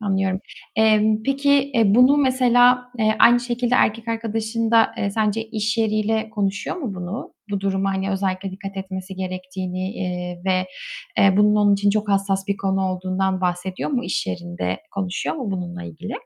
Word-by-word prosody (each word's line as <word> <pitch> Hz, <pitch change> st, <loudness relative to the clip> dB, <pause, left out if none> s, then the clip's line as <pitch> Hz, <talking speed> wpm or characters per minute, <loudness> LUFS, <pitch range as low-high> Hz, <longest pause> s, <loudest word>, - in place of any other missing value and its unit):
Anlıyorum. 195 Hz, -2 st, 0 dB, 0.4 s
Emm, 215 Hz, 0 st, +3 dB
peki, 280 Hz, +1 st, +2 dB
e, 215 Hz, -3 st, +4 dB
bunu 250 Hz, +4 st, +6 dB
mesela, 250 Hz, -2 st, +3 dB
eee, 215 Hz, -1 st, +2 dB
aynı 240 Hz, 0 st, +6 dB
şekilde 245 Hz, 0 st, -1 dB
erkek 230 Hz, -1 st, +1 dB
arkadaşın 225 Hz, 0 st, -2 dB
da, 230 Hz, -1 st, +4 dB
eee, 200 Hz, -, 0 dB
sence 215 Hz, +1 st, 0 dB
iş 220 Hz, -1 st, -2 dB
yeriyle 220 Hz, 0 st, 0 dB
konuşuyor 205 Hz, -, -2 dB
mu 255 Hz, -, -4 dB
bunu? 180 Hz, +7 st, -6 dB, 0.2 s
Bu 200 Hz, -1 st, -1 dB
duruma, 195 Hz, 0 st, 0 dB
hani, 190 Hz, +1 st, -2 dB
özellikle 195 Hz, 0 st, -2 dB
dikkat 195 Hz, +1 st, -8 dB
etmesi 190 Hz, 0 st, -6 dB
gerektiğini, 185 Hz, 0 st, -4 dB
eee, 180 Hz, -2 st, -5 dB
ve, 185 Hz, -1 st, +1 dB, 0.5 s
eee, 195 Hz, -1 st, +5 dB
bunun 210 Hz, +1 st, +4 dB
onun 205 Hz, -1 st, +4 dB
için 200 Hz, +1 st, +2 dB
çok 215 Hz, 0 st, -1 dB
hassas 195 Hz, 0 st, 0 dB
bir 200 Hz, -, 0 dB
konu 195 Hz, -1 st, 0 dB
olduğundan 185 Hz, +1 st, -1 dB
bahsediyor 180 Hz, +3 st, -2 dB
mu? 255 Hz, -4 st, -1 dB
İş 180 Hz, -, -2 dB
yerinde 175 Hz, -, -4 dB
konuşuyor 190 Hz, -, -2 dB
mu 250 Hz, -9 st, -4 dB
bununla 175 Hz, -2 st, -5 dB
ilgili? 180 Hz, +6 st, -8 dB
200 Hz, 165 wpm, -22 LUFS, 190-225 Hz, 0.5 s, bunu